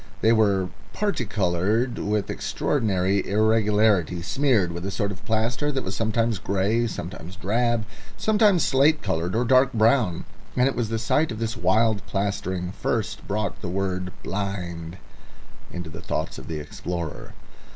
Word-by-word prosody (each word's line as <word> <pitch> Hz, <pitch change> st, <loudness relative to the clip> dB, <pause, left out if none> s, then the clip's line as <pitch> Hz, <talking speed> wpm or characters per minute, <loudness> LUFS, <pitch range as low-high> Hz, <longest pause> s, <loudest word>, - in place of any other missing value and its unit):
They 110 Hz, -, +5 dB
were 100 Hz, -4 st, +3 dB, 0.2 s
particoloured 110 Hz, -, 0 dB
with 105 Hz, -1 st, -1 dB
extraordinary 100 Hz, -7 st, 0 dB
irregularity, 105 Hz, -4 st, +3 dB
smeared 110 Hz, -3 st, +2 dB
with 85 Hz, +1 st, -5 dB
a 95 Hz, -, -2 dB
sort 100 Hz, +1 st, -1 dB
of 100 Hz, 0 st, -9 dB
plaster 115 Hz, +7 st, 0 dB
that 135 Hz, -2 st, -2 dB
was 95 Hz, 0 st, -4 dB
sometimes 115 Hz, 0 st, 0 dB
grey, 100 Hz, +5 st, +1 dB
sometimes 90 Hz, -4 st, -7 dB
drab, 115 Hz, +3 st, 0 dB, 0.3 s
sometimes 210 Hz, -, +4 dB
slate 150 Hz, +3 st, +3 dB
coloured 85 Hz, +5 st, -1 dB
or 120 Hz, +2 st, +2 dB
dark 130 Hz, +2 st, +4 dB
brown; 110 Hz, -5 st, +2 dB, 0.3 s
and 125 Hz, +1 st, +4 dB
it 135 Hz, -, -1 dB
was 115 Hz, -3 st, -1 dB
the 115 Hz, -, -1 dB
sight 150 Hz, +7 st, +1 dB
of 110 Hz, -, -4 dB
this 115 Hz, 0 st, -2 dB
wild 110 Hz, -3 st, +2 dB
plastering 95 Hz, -3 st, -2 dB
first -, -, -2 dB
brought 105 Hz, -1 st, -2 dB
the 90 Hz, -, -4 dB
word 95 Hz, 0 st, -2 dB
"blind" 90 Hz, -4 st, -4 dB, 0.7 s
into 90 Hz, -2 st, -6 dB
the 80 Hz, -, -8 dB
thoughts -, -, -3 dB
of -, -, -11 dB
the 80 Hz, -2 st, -4 dB
explorer. 85 Hz, +1 st, -5 dB
105 Hz, 150 wpm, -25 LUFS, 95-115 Hz, 0.7 s, They